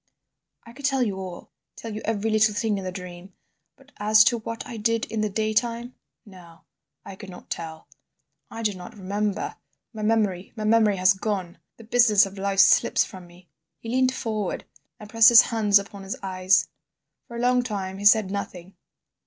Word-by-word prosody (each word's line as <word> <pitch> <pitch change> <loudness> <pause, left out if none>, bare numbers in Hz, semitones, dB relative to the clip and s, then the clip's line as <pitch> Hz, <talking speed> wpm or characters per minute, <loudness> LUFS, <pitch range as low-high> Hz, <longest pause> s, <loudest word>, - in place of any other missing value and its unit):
"I 230 - -14
could 280 +2 -7
tell 270 -2 +1
you 200 -5 -2
all, 185 -2 -9 0.2
tell 225 -2 -8
you 215 - -6
every 220 0 -1
little 215 -1 +3
thing 210 -2 -1
in - - -7
the 185 - -4
dream, 180 0 -10 0.4
but 270 +1 -23
as 215 +1 +5
to 235 0 +1
what 230 +1 -7
I 235 - -8
did 230 +1 0
in 220 -1 -2
the 215 - -1
daytime—no. 215 -5 -5 0.4
I 195 - -9
could 195 0 -11
not 180 - -13
tell—I 165 +7 -10
do 210 -2 0
not 180 +3 -11
remember. 205 +1 -3 0.4
My 215 - -7
memory—my 210 -1 -1
memory 215 -1 +3
has 185 0 +4
gone. 190 -4 -4 0.2
The 230 - -13
business 225 -3 +4
of 195 0 -10
life 195 0 +2
slips - - +4
from 185 -2 -12
me—" 175 +1 -19 0.3
He 225 - -9
leant 255 +1 +2
forward, 215 -6 -4 0.3
and 210 - -11
pressed 225 +2 +6
his 235 -2 +8
hands 210 -3 +3
upon 200 0 -6
his 195 +1 -6
eyes. 185 0 +2 0.6
For 235 - -9
a - - -5
long 250 +1 +2
time 195 -5 -5
he 205 - -6
said 210 -2 +5
nothing. 190 -2 -6
210 Hz, 180 wpm, -24 LUFS, 190-225 Hz, 0.6 s, his